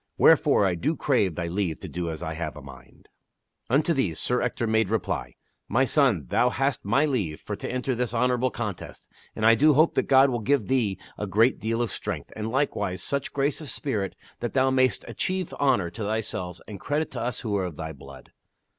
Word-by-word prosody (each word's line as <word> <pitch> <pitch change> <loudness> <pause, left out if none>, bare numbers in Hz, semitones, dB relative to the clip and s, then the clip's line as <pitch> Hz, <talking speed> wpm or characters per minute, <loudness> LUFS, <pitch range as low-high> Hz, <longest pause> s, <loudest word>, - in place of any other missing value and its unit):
Wherefore 100 - +5
I 95 - +2
do 140 - -1
crave 105 - +1
thy 85 - -2
leave 85 -2 -2
to - - -6
do 85 -1 -4
as 80 +1 -5
I 80 -1 -3
have 85 +2 -4
a - - -9
mind." 65 -2 -14 0.6
Unto 145 +7 +3
these 100 - 0
Sir 125 0 0
Ector 120 - -1
made 110 -2 +2
reply: 110 0 -2 0.2
" - - -48
My 130 +3 +2
son, 120 - +2
thou 125 - +3
hast 135 0 -1
my 125 +9 +2
leave 100 - -1
for 105 - -5
to - - -5
enter 130 +1 -1
this 120 -2 -1
honorable 125 +1 +1
contest, 105 -7 -6 0.3
and 110 - -1
I 115 - +8
do 145 +5 +5
hope 155 +4 +4
that - - 0
God 135 0 +6
will 120 - -1
give 115 +1 +1
thee 115 -8 +1 0.2
a 105 - -2
great 110 +7 +3
deal 115 +2 -1
of 120 - -3
strength, 90 -9 -5
and 110 0 -3
likewise 105 -8 -1
such 140 -1 -2
grace 140 +3 0
of 150 - -7
spirit 105 -10 -2 0.2
that 120 - -3
thou 130 0 +3
mayst 130 -1 +2
achieve 185 -2 -2
honor 120 -12 +2
to 110 - -8
thyself 100 -4 -3
and 105 -3 -8
credit 150 +2 -1
to 120 - -5
us 120 0 -3
who 105 -3 -2
are 95 -2 0
of 85 -4 -7
thy 80 0 -5
blood." 70 -2 -13
115 Hz, 215 wpm, -26 LUFS, 95-130 Hz, 0.6 s, I